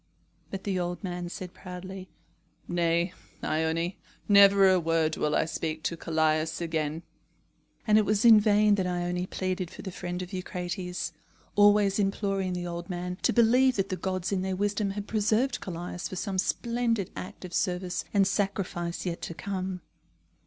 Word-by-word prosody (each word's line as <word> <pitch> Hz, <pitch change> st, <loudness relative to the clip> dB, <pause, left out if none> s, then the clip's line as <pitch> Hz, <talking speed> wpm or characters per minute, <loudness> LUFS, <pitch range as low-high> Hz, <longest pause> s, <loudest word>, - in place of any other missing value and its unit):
But 195 Hz, -1 st, -6 dB
the 190 Hz, -3 st, -1 dB
old 175 Hz, +3 st, -3 dB
man 175 Hz, -2 st, -4 dB
said 180 Hz, 0 st, -7 dB
proudly: 185 Hz, 0 st, -8 dB, 0.6 s
"Nay, 170 Hz, +1 st, +1 dB, 0.3 s
Ione, 160 Hz, +3 st, 0 dB, 0.3 s
never 200 Hz, -1 st, +7 dB
a 185 Hz, -1 st, +5 dB
word 165 Hz, -1 st, +1 dB
will 150 Hz, 0 st, 0 dB
I -, -, +2 dB
speak 160 Hz, -1 st, -3 dB
to 170 Hz, -, -1 dB
Callias 160 Hz, -1 st, 0 dB
again." 160 Hz, -1 st, -2 dB, 0.8 s
And 215 Hz, -1 st, +5 dB
it -, -, +3 dB
was 210 Hz, +2 st, +1 dB
in 225 Hz, -2 st, +9 dB
vain 210 Hz, 0 st, +4 dB
that 190 Hz, -3 st, +1 dB
Ione 180 Hz, 0 st, -1 dB
pleaded 185 Hz, -2 st, -2 dB
for -, -, -10 dB
the 190 Hz, -, -5 dB
friend 180 Hz, 0 st, -4 dB
of 180 Hz, -, -10 dB
Eucrates, 180 Hz, -2 st, -4 dB, 0.4 s
always 205 Hz, -1 st, +5 dB
imploring 195 Hz, -2 st, 0 dB
the 180 Hz, 0 st, -3 dB
old 175 Hz, 0 st, -5 dB
man 180 Hz, 0 st, -4 dB
to -, -, +3 dB
believe 250 Hz, +2 st, +4 dB
that 195 Hz, -1 st, 0 dB
the 185 Hz, -, -1 dB
gods 185 Hz, 0 st, -2 dB
in 190 Hz, -2 st, 0 dB
their 190 Hz, 0 st, -1 dB
wisdom 205 Hz, +1 st, 0 dB
had 200 Hz, +1 st, -4 dB
preserved 225 Hz, +4 st, +1 dB
Callias 175 Hz, 0 st, -5 dB
for -, -, -6 dB
some 190 Hz, 0 st, -2 dB
splendid 230 Hz, -2 st, 0 dB
act 185 Hz, -, -7 dB
of 180 Hz, -, -9 dB
service 180 Hz, -1 st, -1 dB
and 200 Hz, -2 st, +4 dB
sacrifice 190 Hz, -4 st, -2 dB
yet 170 Hz, -2 st, -3 dB
to 170 Hz, -, -5 dB
come. 185 Hz, +1 st, -4 dB
185 Hz, 165 wpm, -28 LUFS, 175-200 Hz, 0.8 s, in